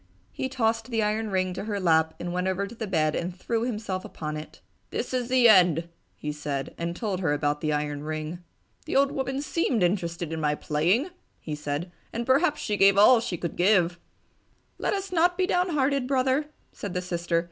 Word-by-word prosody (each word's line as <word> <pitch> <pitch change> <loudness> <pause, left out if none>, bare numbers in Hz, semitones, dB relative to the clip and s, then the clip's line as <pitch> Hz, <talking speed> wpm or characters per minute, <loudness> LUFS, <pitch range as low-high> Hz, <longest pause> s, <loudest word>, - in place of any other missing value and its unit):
He 260 - -3
tossed 225 -3 0
the 225 -3 +1
iron 215 +1 0
ring 185 -1 0
to 190 - -5
her 205 -2 -2
lap 160 -3 +3
and 175 0 -4
went 180 +1 -1
over 190 +1 0
to 200 - -9
the 225 -2 -5
bed 155 -5 +1
and 175 +1 -3
threw 225 +4 -1
himself 210 -6 -3
upon 155 -1 -5
it. 155 +1 -8 0.3
"This - - -4
is 250 -1 -1
the 255 -2 +5
end!" 175 -5 +5 0.3
he 150 - -4
said, 145 -2 -4
and 170 +1 -3
told 200 -2 -2
her 160 -6 +1
about 145 0 0
the 155 - 0
iron 150 -1 -2
ring. 155 +2 -4 0.5
"The - - -3
old 275 0 +4
woman 265 +1 -2
seemed 265 - 0
interested 170 -3 -1
in 160 - -3
my 150 -1 +1
playing!" 180 - +1 0.3
he 155 - -6
said, 150 +3 -4 0.2
"And 235 +1 -3
perhaps 290 +4 +3
she 210 -2 -1
gave 195 0 +5
all 230 +4 +7
she 195 -6 -3
could 170 0 -4
give!" 180 -2 +3 0.8
"Let - - 0
us 390 -1 -4
not 350 0 +3
be 375 - +2
downhearted, 290 -8 +1
Brother!" 265 +2 +1 0.3
said 200 -3 -6
the 180 - 0
sister. 170 -1 0
190 Hz, 200 wpm, -26 LUFS, 165-245 Hz, 0.8 s, all